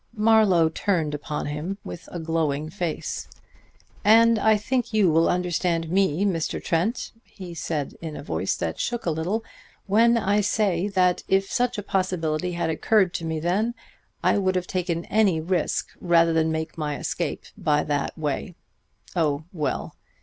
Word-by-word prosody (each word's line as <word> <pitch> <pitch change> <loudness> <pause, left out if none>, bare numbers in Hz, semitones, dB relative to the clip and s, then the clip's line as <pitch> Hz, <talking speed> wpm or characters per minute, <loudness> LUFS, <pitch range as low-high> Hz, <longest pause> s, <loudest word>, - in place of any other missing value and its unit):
Marlowe 210 -6 +5
turned 160 -2 0
upon 150 0 -4
him 150 +7 -4
with 170 - -9
a 175 - -5
glowing 160 -2 -1
face. 175 -5 -3 0.8
"And 225 +1 +6
I 220 0 +4
think 240 +2 -1
you 200 -6 +4
will 165 +1 +4
understand 175 -2 0
me, 190 -1 +2
Mr. 165 -5 -1
Trent," 175 +9 -1
he 180 -3 -10
said 155 -3 -3
in 160 -2 -6
a - - -7
voice 80 - -1
that 85 -1 -3
shook 240 -1 -2
a 170 - +1
little, 180 +8 -1 0.4
"when 230 +4 +4
I 205 -1 +2
say 200 -3 +1
that 185 -3 +2
if 195 0 +1
such 245 -2 0
a 205 - -3
possibility 180 -3 -1
had 170 -1 -1
occurred 190 +3 +2
to 165 - -3
me 160 -1 -2
then, 200 +9 0 0.5
I - - +3
would 190 -1 +1
have 180 -1 0
taken 175 -2 -2
any 200 -6 +2
risk 170 0 -1
rather 170 -2 +4
than 160 0 +2
make 160 +1 -4
my 150 -2 -2
escape - - -3
by 150 -1 +1
that 145 +1 -2
way.... 160 +4 -3 0.6
Oh, 155 -3 +1
well!" 150 -7 -2
175 Hz, 165 wpm, -25 LUFS, 160-200 Hz, 0.8 s, And